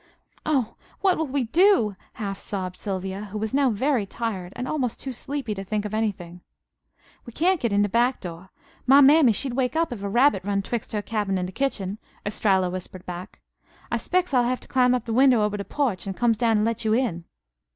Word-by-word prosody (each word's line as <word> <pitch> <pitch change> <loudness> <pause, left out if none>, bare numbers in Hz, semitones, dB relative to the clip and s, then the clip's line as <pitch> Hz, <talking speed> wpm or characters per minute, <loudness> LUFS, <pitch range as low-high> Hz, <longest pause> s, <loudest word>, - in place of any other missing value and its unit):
"Oh! 260 -7 0 0.2
What 380 -2 +4
will 320 - 0
we 275 0 0
do?" 245 - +3 0.2
half 200 -2 -5
sobbed 185 -3 -5
Sylvia, 195 0 -4
who 210 +1 -6
was 215 0 -3
now 275 -1 +3
very 240 -1 0
tired, 190 -6 -4
and 250 +1 -4
almost 260 -7 -2
too 265 - -5
sleepy 270 -2 -4
to 195 -1 -6
think 210 +1 -2
of 210 - -5
anything. 185 -5 -3 0.8
"We 235 - -11
cyan't 360 +5 +2
get 235 -5 -1
in 200 0 +3
de - - +2
back 240 +5 +2
door. 175 +1 -8 0.4
My 270 +2 +8
mammy 285 -2 +7
she'd 250 +4 -1
wake 255 +1 0
up 325 -5 +1
if 215 - -8
a 200 - -3
rabbit 240 -3 +3
run 200 0 -1
twixt 235 +1 -4
her 210 -1 -1
cabin 205 -3 -1
an' 180 - -1
de 180 - -6
kitchen," 205 -5 -2 0.3
Estralla 195 -3 +1
whispered 185 0 -7
back. 180 0 -8 0.5
"I - - +1
'spec's 365 -4 -1
I'll 250 - +5
hev' 250 +1 -1
to - - -14
climb 250 -1 +3
up 245 - -2
to 230 - -5
de 225 - 0
winder 260 -2 +6
ober 210 -1 0
de 200 - -5
porch, 240 -11 -1
and 195 - -4
comes 235 -2 +3
down 225 -1 +2
and 210 - +2
let 230 -1 -1
you 220 -1 +2
in." 210 -10 -1
220 Hz, 225 wpm, -25 LUFS, 195-260 Hz, 0.8 s, My